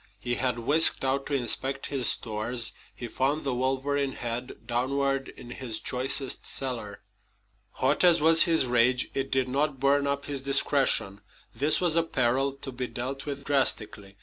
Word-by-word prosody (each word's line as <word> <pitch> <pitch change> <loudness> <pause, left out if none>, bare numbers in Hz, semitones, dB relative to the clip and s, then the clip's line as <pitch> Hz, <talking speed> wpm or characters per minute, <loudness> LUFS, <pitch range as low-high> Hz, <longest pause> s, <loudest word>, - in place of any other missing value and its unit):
He 120 +4 -3
had 125 -1 -1
whisked 145 +4 +4
out 135 +1 -1
to 145 - -2
inspect 135 +2 -1
his 130 -3 +4
stores. 115 +2 -2 0.2
He 120 - -7
found 135 +6 -1
the 135 - -2
wolverine 135 +2 -1
head 120 +1 -6
downward 135 +2 -1
in 120 -1 -12
his 120 -3 -4
choicest 130 +1 +1
cellar. 120 -6 -3 0.7
Hot - - 0
as 175 -2 +5
was 160 +2 +6
his 165 -5 +3
rage, 125 +1 +1
it 135 0 -3
did 130 -1 0
not 140 +1 -2
burn 140 +1 +1
up 140 0 -3
his 140 -2 -5
discretion. 135 -7 +1 0.3
This 145 +7 +1
was 175 -3 +1
a 165 - +4
peril 135 -3 0
to 135 - -3
be 125 0 -5
dealt 135 +4 -6
with 140 -1 -6
drastically. 105 -8 -1
135 Hz, 165 wpm, -26 LUFS, 120-140 Hz, 0.7 s, was